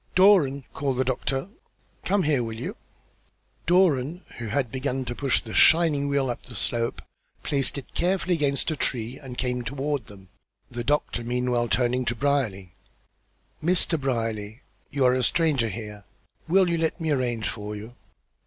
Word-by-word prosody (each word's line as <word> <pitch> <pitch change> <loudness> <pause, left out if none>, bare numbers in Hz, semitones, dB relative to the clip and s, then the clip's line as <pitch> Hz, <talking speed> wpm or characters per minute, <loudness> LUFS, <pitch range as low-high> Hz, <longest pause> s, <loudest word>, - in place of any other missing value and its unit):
"Doran," 180 -8 +5
called 135 -3 -1
the 130 - +2
doctor. 135 +3 -1 0.6
"Come 195 0 +2
here, 150 -4 +2
will 115 -1 -5
you." - - -5 0.9
Doran, 175 -2 +3 0.2
who 115 - -4
had 125 +2 -1
begun 130 0 -2
to 120 - -3
push 135 +1 0
the 110 - -8
shining 155 -4 +5
wheel 140 -2 +1
up 120 - -6
the - - -12
slope, 115 -1 -1 0.4
placed 140 -1 +1
it 140 - -8
carefully 185 0 +1
against 145 -1 +1
a - - -1
tree 120 -2 -2
and 130 -3 -9
came 125 -1 -1
toward 140 +3 -3
them, 95 -2 -14 0.4
the 120 -1 -4
doctor 145 -3 0
meanwhile 120 0 0
turning 125 0 +1
to 120 - -1
Brierly. 115 -10 -1 0.9
"Mr. 170 -2 +3
Brierly, 115 -3 -2 0.3
you 140 -2 +1
are 125 - +5
a 130 - +1
stranger 140 -3 +2
here. 105 -1 -7 0.4
Will 185 +3 +4
you 170 -1 0
let 160 +2 -1
me 160 -2 -1
arrange 120 -5 0
for 105 -2 -5
you?" 110 +3 -9
130 Hz, 160 wpm, -25 LUFS, 120-150 Hz, 0.9 s, Doran